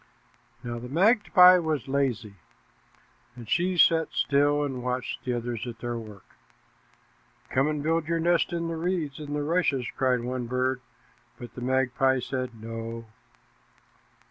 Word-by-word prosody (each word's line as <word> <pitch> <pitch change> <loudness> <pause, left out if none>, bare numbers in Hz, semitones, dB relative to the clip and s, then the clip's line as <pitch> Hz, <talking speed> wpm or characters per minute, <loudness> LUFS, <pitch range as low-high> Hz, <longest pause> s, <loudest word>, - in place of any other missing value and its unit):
Now 120 -1 -5
the 125 +1 -8
magpie 185 - +6
was 155 -6 -2
lazy, 125 -6 -1 1.0
and 120 -2 -11
she 180 - 0
sat 165 -1 +5
still 145 +1 +2
and 135 -3 -4
watched 125 0 -3
the 125 - -2
others 120 0 -4
at 120 -1 -7
their 120 +1 -4
work. 105 -4 -12 1.3
"Come 135 +2 +2
and 150 -1 -2
build 165 0 0
your 165 0 0
nest 170 +1 +2
in 170 -1 -2
the 165 -1 -4
reeds 165 -5 -2
and 150 -1 -8 0.2
rushes," 155 -7 +1
cried 130 -2 +1
one 125 0 -4
bird, 125 +1 -1 0.6
but 120 - -10
the 125 - -9
magpie 130 +1 +1
said 130 -1 -4
"No." 115 +1 -6
130 Hz, 145 wpm, -26 LUFS, 120-160 Hz, 1.3 s, magpie